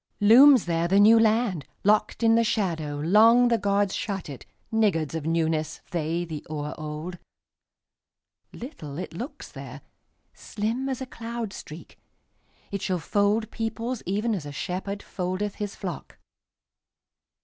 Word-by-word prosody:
Looms 250 Hz, +4 st, +7 dB
there 170 Hz, 0 st, 0 dB
the 195 Hz, +3 st, +3 dB
New 220 Hz, +3 st, +7 dB
Land:Locked 215 Hz, -, +1 dB
in 225 Hz, 0 st, +5 dB
the 230 Hz, -, +4 dB
shadowLong 210 Hz, +3 st, +3 dB
the 230 Hz, -1 st, +2 dB
gods 200 Hz, 0 st, +1 dB
shut 195 Hz, -6 st, -4 dB
it, 135 Hz, -, -9 dB, 0.3 s
Niggards 180 Hz, -10 st, +1 dB
of 160 Hz, -2 st, -4 dB
newnessThey, 165 Hz, +1 st, -1 dB
the 155 Hz, -3 st, -6 dB
o'er 150 Hz, -1 st, -4 dB
old. 155 Hz, +4 st, -6 dB, 1.3 s
Little 155 Hz, -, -8 dB
it 180 Hz, -, -6 dB
looks 260 Hz, -, -7 dB
there, -, -, -9 dB, 0.5 s
Slim 230 Hz, +6 st, -3 dB
as 265 Hz, -1 st, -3 dB
a -, -, -3 dB
cloud 230 Hz, -3 st, -6 dB
streak; 155 Hz, -2 st, -11 dB, 0.7 s
It 200 Hz, -2 st, -3 dB
shall 185 Hz, -, -1 dB
fold 205 Hz, +6 st, 0 dB
peoplesEven 225 Hz, -2 st, -2 dB
as 155 Hz, -7 st, -6 dB
a -, -, -6 dB
shepherdFoldeth 185 Hz, +3 st, -4 dB
his 205 Hz, -1 st, -4 dB
flock. -, -, -7 dB
200 Hz, 125 wpm, -26 LUFS, 165-225 Hz, 1.3 s, Looms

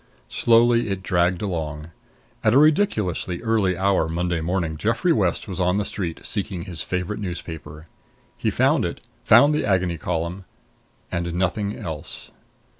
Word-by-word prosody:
Slowly 115 Hz, 0 st, +3 dB
it 95 Hz, -1 st, -3 dB
dragged 90 Hz, 0 st, +1 dB
along. 80 Hz, -4 st, -4 dB, 0.5 s
At 110 Hz, +2 st, +4 dB
a -, -, +7 dB
ridiculously 140 Hz, -, +2 dB
early 105 Hz, -6 st, +1 dB
hour 95 Hz, -4 st, +2 dB
Monday 85 Hz, 0 st, -1 dB
morning 85 Hz, -1 st, -1 dB
Geoffrey 115 Hz, -, +1 dB
West 95 Hz, -4 st, 0 dB
was 95 Hz, -2 st, -5 dB
on 90 Hz, +1 st, +2 dB
the 105 Hz, -, 0 dB
street, 90 Hz, -5 st, -4 dB
seeking 95 Hz, -4 st, -3 dB
his 85 Hz, -2 st, -6 dB
favorite 90 Hz, +3 st, -3 dB
newspaper. 80 Hz, -5 st, -7 dB, 0.5 s
He -, -, -1 dB
found -, -, +2 dB
it, -, -, -4 dB, 0.2 s
found 145 Hz, +2 st, +6 dB
the 150 Hz, -, 0 dB
Agony 90 Hz, -4 st, +1 dB
Column 85 Hz, +3 st, -3 dB, 0.7 s
and 85 Hz, 0 st, -2 dB
nothing 100 Hz, +3 st, -1 dB
else. 80 Hz, -2 st, -6 dB
90 Hz, 145 wpm, -23 LUFS, 85-105 Hz, 0.7 s, a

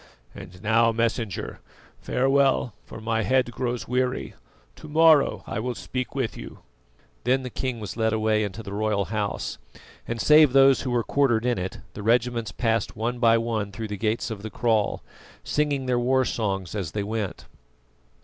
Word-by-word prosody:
And 90 Hz, +4 st, -11 dB
now, 115 Hz, +2 st, +4 dB
Messenger, 115 Hz, -3 st, -2 dB, 0.4 s
farewell, 135 Hz, -2 st, +2 dB
for -, -, -10 dB
my 115 Hz, 0 st, -1 dB
head 125 Hz, +3 st, +1 dB
grows 120 Hz, -1 st, -3 dB
weary. 125 Hz, 0 st, -1 dB, 0.4 s
To 155 Hz, -, -11 dB
morrow 155 Hz, -1 st, +4 dB
I -, -, -4 dB
will 125 Hz, +2 st, -3 dB
speak 130 Hz, 0 st, -5 dB
with 130 Hz, -5 st, -1 dB
you." -, -, -10 dB, 0.6 s
Then 130 Hz, +2 st, +2 dB
the 125 Hz, -, -6 dB
king 130 Hz, -1 st, -3 dB
was 105 Hz, -, -6 dB
led 110 Hz, -1 st, +1 dB
away 110 Hz, -1 st, +1 dB
into 105 Hz, +2 st, -5 dB
the 100 Hz, -1 st, -7 dB
royal 105 Hz, -1 st, 0 dB
house, 105 Hz, -2 st, -3 dB, 0.5 s
and 120 Hz, 0 st, -3 dB
save 150 Hz, -1 st, +6 dB
those 135 Hz, -1 st, +6 dB
who 130 Hz, -, -3 dB
were 120 Hz, -1 st, +1 dB
quartered 120 Hz, -5 st, +1 dB
in 120 Hz, -5 st, +1 dB
it, 90 Hz, +1 st, -5 dB
the 105 Hz, -, -7 dB
regiments 115 Hz, -1 st, +1 dB
passed 115 Hz, +2 st, -1 dB
one 120 Hz, +3 st, -2 dB
by 115 Hz, -1 st, +5 dB
one 115 Hz, -3 st, -2 dB
through 110 Hz, +2 st, -6 dB
the 105 Hz, -, -3 dB
gates 110 Hz, +2 st, -1 dB
of 105 Hz, -3 st, -6 dB
the 110 Hz, -, -6 dB
kraal, 110 Hz, -2 st, 0 dB, 0.4 s
singing 145 Hz, -3 st, 0 dB
their 125 Hz, -1 st, +1 dB
war 130 Hz, +2 st, +2 dB
songs 95 Hz, -7 st, -2 dB
as 95 Hz, -7 st, -4 dB
they 105 Hz, -, -1 dB
went. 105 Hz, -4 st, -4 dB
115 Hz, 175 wpm, -25 LUFS, 110-125 Hz, 0.6 s, save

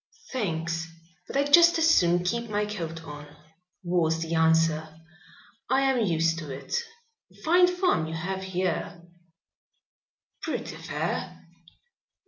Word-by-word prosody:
"Thanks, 165 Hz, -8 st, -2 dB, 0.4 s
but -, -, -3 dB
I'd 285 Hz, +1 st, 0 dB
just 340 Hz, +1 st, +8 dB
as 325 Hz, 0 st, +3 dB
soon 175 Hz, -, +4 dB
keep 235 Hz, +5 st, -2 dB
my 210 Hz, 0 st, 0 dB
coat 165 Hz, -6 st, -5 dB
on," 150 Hz, -1 st, -9 dB, 0.6 s
was 170 Hz, -2 st, +1 dB
the 165 Hz, 0 st, -3 dB
answer. 160 Hz, -1 st, +2 dB, 0.7 s
"I 265 Hz, +2 st, +3 dB
am 265 Hz, -3 st, +2 dB
used 165 Hz, -3 st, +1 dB
to 155 Hz, -3 st, -8 dB
it. 135 Hz, -, -8 dB, 0.7 s
Fine 355 Hz, +3 st, +6 dB
farm 360 Hz, -, +1 dB
you 160 Hz, -, -5 dB
have 190 Hz, +4 st, -3 dB
here." 180 Hz, -2 st, -3 dB, 1.4 s
"Pretty -, -, -4 dB
fair." -, -, -4 dB
175 Hz, 120 wpm, -27 LUFS, 160-235 Hz, 1.4 s, just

